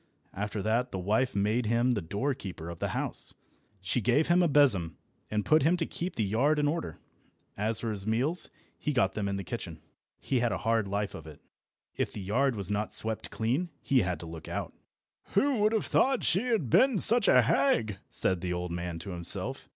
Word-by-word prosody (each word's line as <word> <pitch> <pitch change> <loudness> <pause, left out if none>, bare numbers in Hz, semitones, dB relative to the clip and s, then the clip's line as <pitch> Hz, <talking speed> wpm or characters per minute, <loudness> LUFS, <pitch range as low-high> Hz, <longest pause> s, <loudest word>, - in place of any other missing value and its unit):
After 105 0 -4
that 120 +3 0
the - - -4
wife 105 +7 0
made 105 +4 +1
him 120 +3 +2
the 110 -5 0
door 100 - -2
keeper 90 -8 -7
of 85 - -10
the - - -1
house. - - -4 0.5
She 95 +6 -1
gave 125 +9 +2
him 175 +1 +5
a 175 - +4
besom, 100 - +3 0.3
and 105 -1 -1
put 155 +1 +4
him 165 +6 +3
to 165 - -1
keep 175 +1 -5
the 110 - 0
yard 125 +10 +2
in 145 0 +2
order. 145 - -3 0.6
As 110 +2 -1
for 115 - -2
his 100 -1 -4
meals, 130 +11 +1 0.3
he 150 - -2
got 95 -8 +2
them 105 -2 -2
in 100 - -2
the 100 - -4
kitchen. 90 -10 -6 0.4
He 130 - -1
had 120 -1 +1
a - - -1
hard 115 -2 0
life 100 +1 -2
of 80 - -9
it. 75 -2 -12 0.6
If - - -1
the - - -6
yard 120 +7 0
was 100 -1 -3
not 105 +1 -1
swept 110 0 +4
clean, 130 +11 -1
he 135 - +2
had 90 -4 -2
to - - -7
look 80 -1 -9
out. - - -4 0.6
"Who 265 +3 +3
would 210 +1 +3
have 220 -2 0
thought 265 -1 +2
she 195 +8 +1
had 210 - 0
been 260 -4 +5
such 225 +3 +4
a 125 - +6
hag?" 110 -5 +1
said 95 -2 -1
the 90 -1 -2
old 90 0 -4
man 85 0 -4
to 90 +4 -7
himself. 85 -1 -1
110 Hz, 215 wpm, -29 LUFS, 95-145 Hz, 0.6 s, a